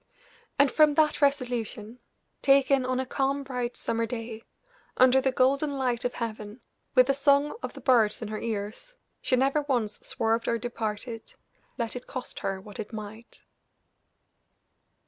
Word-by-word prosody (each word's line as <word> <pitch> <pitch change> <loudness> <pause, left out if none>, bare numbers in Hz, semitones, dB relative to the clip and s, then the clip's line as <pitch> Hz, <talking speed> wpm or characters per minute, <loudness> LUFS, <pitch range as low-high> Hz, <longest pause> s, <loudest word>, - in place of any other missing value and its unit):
And 280 -2 +4
from 305 -2 +4
that 305 -1 +2
resolution, 245 -5 -1 0.4
taken 275 -1 +4
on 255 0 0
a 260 - -1
calm, 275 +2 -1
bright 250 -3 -4
summer 230 0 -1
day, 225 -1 -6 0.6
under 255 +1 +6
the 265 0 +1
golden 275 +3 +1
light 250 -2 -1
of 245 - -1
heaven, 215 -1 -5 0.4
with 255 -1 +7
the 275 - +2
song 280 +1 +3
of - - -5
the - - -11
birds 230 -5 +3
in 220 - -5
her 215 0 -4
ears, 225 - -5 0.3
she 255 - +1
never 270 +4 +2
once 240 -7 -1
swerved 225 0 -1
or 235 - +1
departed, 225 0 -5 0.4
let 235 -2 -2
it 250 - -7
cost 255 -2 -6
her 195 -1 -3
what 205 +1 -11
it 215 - -5
might. 220 +1 -9
250 Hz, 155 wpm, -27 LUFS, 225-275 Hz, 0.6 s, with